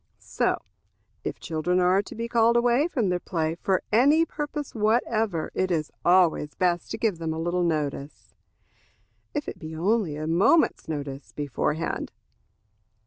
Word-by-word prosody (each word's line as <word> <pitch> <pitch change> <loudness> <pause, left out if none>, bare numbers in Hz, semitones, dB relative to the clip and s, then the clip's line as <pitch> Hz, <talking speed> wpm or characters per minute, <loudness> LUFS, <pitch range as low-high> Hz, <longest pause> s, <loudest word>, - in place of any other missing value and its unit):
So, - - -1 0.6
if - - -4
children 170 +3 -1
are 180 +2 +4
to 205 - -11
be 230 +1 -3
called 235 0 +3
away 245 +5 +3
from 240 - 0
their 180 0 0
play 160 -3 -2
for 185 +2 0
any 285 +9 +5
purpose 295 -2 -5
whatever, 215 -5 0
it 185 - 0
is 160 -4 -1
always 175 -4 +3
best 175 -2 0
to - - -4
give 210 -7 0
them 160 -1 -2
a - - -4
little 175 +2 0
notice, 150 -4 -3 1.0
if 295 - -2
it - - -6
be 160 -3 -7
only 190 -1 +1
a 155 +1 -4
moment's 180 - +3
notice, 145 -3 -5
beforehand. 150 +2 -2
180 Hz, 150 wpm, -26 LUFS, 160-230 Hz, 1.0 s, any